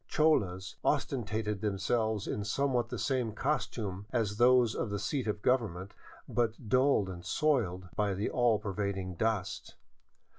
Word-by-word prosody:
Cholas 95 - +1
ostentated 110 -4 -1
themselves 105 +1 0
in 105 - -3
somewhat 120 +2 0
the 125 - -4
same 120 0 0
costunle 110 -7 -2
as 105 -4 0
those 120 -1 +5
of - - -2
the 100 - -2
seat 120 +5 -2
of 105 -1 -2
government, 105 -7 0 0.3
but 115 0 -1
dulled 130 -3 +3
and 90 -2 -7
soiled 95 -6 0
by 105 -2 +1
the 100 +3 -1
all 120 -3 +3
pervading 100 -2 -3
dust. 105 +1 -2
110 Hz, 140 wpm, -31 LUFS, 100-120 Hz, 0.3 s, those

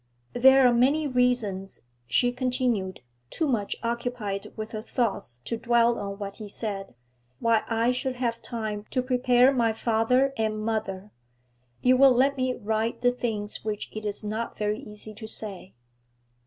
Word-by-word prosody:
'There 265 +2 +6
are 245 - +4
many 280 +6 +3
reasons,' 245 - 0 0.2
she 245 - +2
continued, 245 -6 -1 0.3
too 320 - -1
much 220 -7 -1
occupied 235 -4 -3
with 215 0 -6
her 215 - -4
thoughts 220 - -2
to 230 - -2
dwell 235 0 +3
on 200 -1 -5
what 200 -1 -6
he 215 -2 -8
said, 195 - -5 0.4
'why 230 - +2
I 230 +1 +2
should 255 +1 -2
have 235 -2 -2
time 215 -3 -4
to 255 - 0
prepare 250 0 +4
my 230 -3 +2
father 235 +4 +2
and 220 -1 0
mother. 210 -2 -3 0.7
You 255 0 +5
will 270 0 +7
let 270 +3 +3
me 255 -1 0
write 220 +2 -2
the 245 - +5
things 220 -4 -3
which 215 -1 -4
it 215 - -6
is 210 0 -3
not 220 +2 -4
very 210 +1 -1
easy 215 -4 -10
to 220 +1 -9
say.' 200 -4 -4
230 Hz, 160 wpm, -26 LUFS, 210-250 Hz, 0.7 s, will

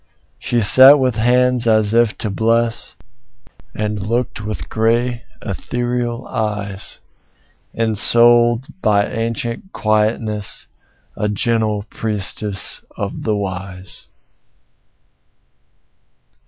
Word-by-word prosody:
She 120 -1 -1
sat 130 +7 +8
with 130 -4 0
hands 125 +1 +2
as 110 -1 +3
if 115 -2 +2
to 105 - -3
bless, 115 +2 0 0.8
And 105 -1 -3
looked 115 +2 -2
with 105 0 -5
grave, 120 +2 0 0.2
ethereal 120 +4 -3
eyes; 105 -3 -3 0.7
Ensouled 120 +2 +4 0.2
by 105 -2 +2
ancient 115 +8 -4
quietness, 110 - -1 0.5
A 105 - -2
gentle 110 -1 0
priestess 105 -2 -2 0.2
of 100 -1 -5
the 110 -2 -1
Wise. 95 -1 -6
110 Hz, 85 wpm, -18 LUFS, 105-120 Hz, 0.8 s, sat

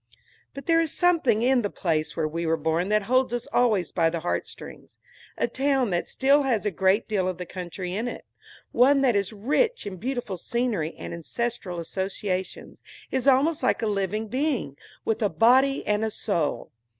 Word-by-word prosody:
But 275 - -8
there 330 -1 +4
is 320 -3 -1
something 315 -11 +2
in 255 0 +3
the 205 - -2
place 155 -5 -2
where 160 -2 +1
we 165 +2 -3
were 165 0 +2
born 160 +4 0
that 210 0 +2
holds 255 +2 +2
us 240 - -4
always 215 -9 +2
by 165 -2 +2
the 165 0 -4
heartstrings. 175 - -6 0.4
A - - +1
town 270 -4 0
that 175 - -1
still 275 +2 +3
has 245 -7 0
a 210 - +1
great 190 +4 +2
deal 195 -4 0
of 185 -2 -3
the 180 - -5
country 180 0 -6
in 220 +5 -2
it, - - -7 0.5
one 270 +3 +4
that 250 -5 +3
is 200 0 0
rich 290 - 0
in 195 -2 -6
beautiful 240 -2 -3
scenery 215 -6 -2
and - - -7
ancestral 180 +1 -4
associations, 190 +2 -4 0.3
is 265 +1 -1
almost 280 +4 +4
like - - +1
a - - +2
living 210 +1 -1
being, 255 - -1 0.3
with 225 +1 -1
a 210 - +2
body 260 +6 +3
and 210 +1 +1
a 220 - 0
soul. 175 -8 -2
215 Hz, 185 wpm, -25 LUFS, 180-255 Hz, 0.5 s, there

